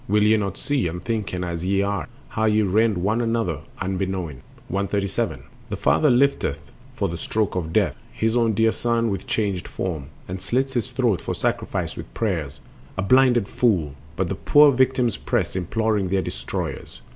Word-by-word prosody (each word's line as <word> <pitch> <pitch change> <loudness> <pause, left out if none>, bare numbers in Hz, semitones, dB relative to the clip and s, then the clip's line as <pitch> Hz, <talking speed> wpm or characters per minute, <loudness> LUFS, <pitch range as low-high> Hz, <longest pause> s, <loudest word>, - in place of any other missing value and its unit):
Will 105 +1 +3
ye 110 +1 +5
not 100 -3 -1
see, 140 -9 0
unthinking 90 +1 -3
as 85 -1 -3
ye 100 +1 +2
are, 100 -3 -2 0.2
How 110 - 0
ye 110 0 +3
rend 105 +1 +2
one 105 +6 +1
another 115 - 0 0.2
unbeknown? 95 -6 -3 0.3
137. 100 0 -1 0.3
The - - -2
father 150 - +3
lifteth 120 - +1 0.2
for - - 0
the 85 - -4
stroke 110 +3 -1
of 85 -3 -2
death - - +2 0.2
His 110 +1 0
own 115 -2 +3
dear 110 +1 +4
son 115 -1 0
within 95 -1 -3
a - - -12
changed 100 -4 -1
form, 80 -7 -4 0.2
And 90 +1 -5
slits 135 +2 0
his 120 0 -1
throat 120 -8 +1
for - - -3
sacrifice - - -2
with - - -8
prayers— 85 -11 -2 0.4
A 95 - 0
blinded 125 -1 +4
fool! 90 - +1 0.2
But 95 +2 0
the - - 0
poor 145 0 +6
victims 130 -2 +2
press, 105 -10 -1
Imploring 105 +2 0
their 95 0 +1
destroyers. - - -5
105 Hz, 175 wpm, -23 LUFS, 90-115 Hz, 0.4 s, poor